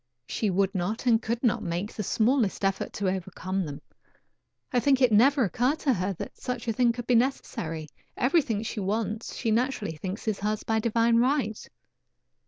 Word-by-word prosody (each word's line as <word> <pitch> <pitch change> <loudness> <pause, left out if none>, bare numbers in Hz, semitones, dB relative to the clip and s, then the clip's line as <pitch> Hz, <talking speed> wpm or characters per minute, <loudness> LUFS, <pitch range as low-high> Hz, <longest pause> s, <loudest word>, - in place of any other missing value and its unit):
She 215 - -1
would 195 +1 +1
not 195 +6 -2
and 230 -2 +4
could 235 +2 -3
not 235 - +2
make 175 +5 -3
the - - -4
smallest 220 0 +1
effort 195 0 -1
to 200 - -2
overcome 185 0 -2
them. 145 0 -8 0.9
I 250 - +4
think 270 +1 +3
it 250 -3 +4
never 260 +6 +5
occurred 245 - +1
to 275 - +3
her 190 -1 -1
that - - -8
such 250 -2 -4
a 225 - +1
thing 240 +1 +3
could 240 0 -6
be 250 - +2
necessary; 170 - -1 0.3
everything 250 -6 +2
she 220 - -4
wants 215 +3 -2
she 225 - -1
naturally 230 -6 0
thinks 185 +7 -6
is 215 -2 0
hers 210 +1 -1
by 220 0 +1
divine 230 +1 +2
right. 245 -3 0
220 Hz, 185 wpm, -27 LUFS, 195-245 Hz, 0.9 s, never